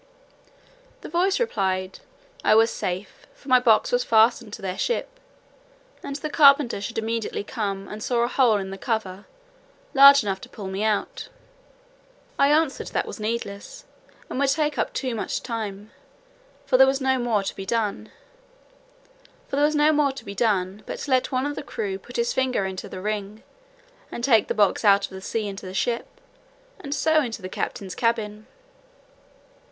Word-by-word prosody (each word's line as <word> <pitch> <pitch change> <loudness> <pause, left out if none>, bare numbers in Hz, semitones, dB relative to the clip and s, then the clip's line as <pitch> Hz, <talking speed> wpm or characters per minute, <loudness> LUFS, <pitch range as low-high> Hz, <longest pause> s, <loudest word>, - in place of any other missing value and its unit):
The - - -9
voice 365 +4 +1
replied, 190 - -1 0.4
"I - - +5
was 225 +1 +5
safe, 185 +2 -5
for 275 - -14
my 255 0 +6
box 245 - +3
was - - +2
fastened 220 - +3
to - - -7
their 190 0 -4
ship; - - -2 0.8
and 280 - -6
the 295 +2 -4
carpenter 280 -8 +5
should 225 +3 -5
immediately 225 -1 -2
come 200 -3 -4
and 210 +1 -8
saw 240 +1 0
a - - +1
hole 245 -4 +3
in 190 -1 -5
the 195 - -8
cover, 205 -5 -3 0.7
large 280 -1 +8
enough 195 -2 -3
to - - -11
pull 205 - -9
me 190 +2 -3
out." 215 -2 -2 1.1
I 280 - +5
answered, 300 -1 +1
"that - - -2
was - - -8
needless, 230 - -5 0.4
and - - -5
would 280 -1 +2
take 300 +1 0
up - - 0
too 260 -3 -3
much 225 - -3
time; 215 -3 -5 0.7
for 270 -2 +3
there 265 +1 +7
was 270 0 +1
no 265 -1 +1
more 230 -4 0
to - - -4
be 195 - -7
done, 220 -2 -2 1.4
but 275 - 0
let 260 -6 0
one 255 +1 0
of 290 0 -3
the - - -5
crew 400 -5 -4
put - - -14
his 475 0 0
finger 255 -6 0
into 190 -1 -6
the 185 - -7
ring, 210 +1 -4 0.7
and 235 - -6
take 230 -5 +4
the - - -2
box 205 +1 +2
out 200 -1 +5
of - - -13
the 190 0 -8
sea 215 +2 -3
into 195 -1 -7
the 185 - -8
ship, 235 +3 -1 0.7
and 285 0 -4
so 315 +2 +3
into 230 -6 -5
the - - -4
captain's 190 0 -4
cabin." 215 -2 -2
230 Hz, 165 wpm, -24 LUFS, 200-275 Hz, 1.4 s, large